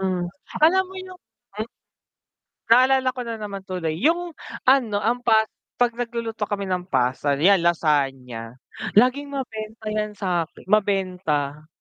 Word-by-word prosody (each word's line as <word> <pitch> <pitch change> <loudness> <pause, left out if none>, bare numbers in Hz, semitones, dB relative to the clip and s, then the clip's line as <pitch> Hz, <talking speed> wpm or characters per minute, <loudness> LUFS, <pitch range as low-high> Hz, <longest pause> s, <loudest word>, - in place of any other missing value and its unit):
Mm. 185 -2 -1 0.4
Alam 375 +4 +5
mo 380 - -12
yung 370 0 -10 1.5
Naalala 255 +2 +5
ko 255 - -5
na 230 -1 -3
naman 205 -2 -6
tuloy, 180 -4 -2
yung 340 +4 +1 0.3
ano, 255 -6 +4
ang 240 +3 +1
pas 220 -2 +4 0.3
'pag 245 -1 +3
nagluluto 230 -2 -3
kami 200 -1 -2
ng 180 -1 -1
pasta, 130 +1 +1
'yan 190 +5 +5
lasagna, 135 -8 0 0.4
laging 255 +5 +4
mabenta 220 -5 -6
yan 210 0 -2
sa 180 -5 0 0.2
mabenta 180 -8 0
210 Hz, 125 wpm, -23 LUFS, 170-245 Hz, 1.5 s, Alam